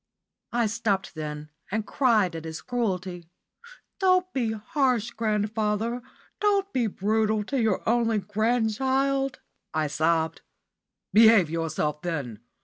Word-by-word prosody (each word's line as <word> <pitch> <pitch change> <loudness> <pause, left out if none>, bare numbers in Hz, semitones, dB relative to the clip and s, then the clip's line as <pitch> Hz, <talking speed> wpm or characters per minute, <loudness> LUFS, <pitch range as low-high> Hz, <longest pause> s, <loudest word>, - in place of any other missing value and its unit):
I 235 -1 +1
stopped 210 -4 -1
then 150 -1 -6 0.2
and 215 +1 -2
cried 215 -11 +2
at 165 - -6
his 160 0 -6
cruelty. 185 -8 -3 0.7
"Don't 370 -1 +3
be 235 -4 0
harsh, 240 0 0
grandfather 215 +1 -1 0.4
don't 400 -1 +1
be 240 -3 +1
brutal 215 +1 0
to 265 +4 -1
your 220 -4 0
only 230 -1 +2
grandchild," 245 +6 0 0.3
I 155 -1 +1
sobbed. 160 +2 0 0.7
"Behave 220 -7 +6
yourself, 155 -2 -2
then. 140 -11 -4
215 Hz, 115 wpm, -26 LUFS, 175-240 Hz, 0.7 s, Behave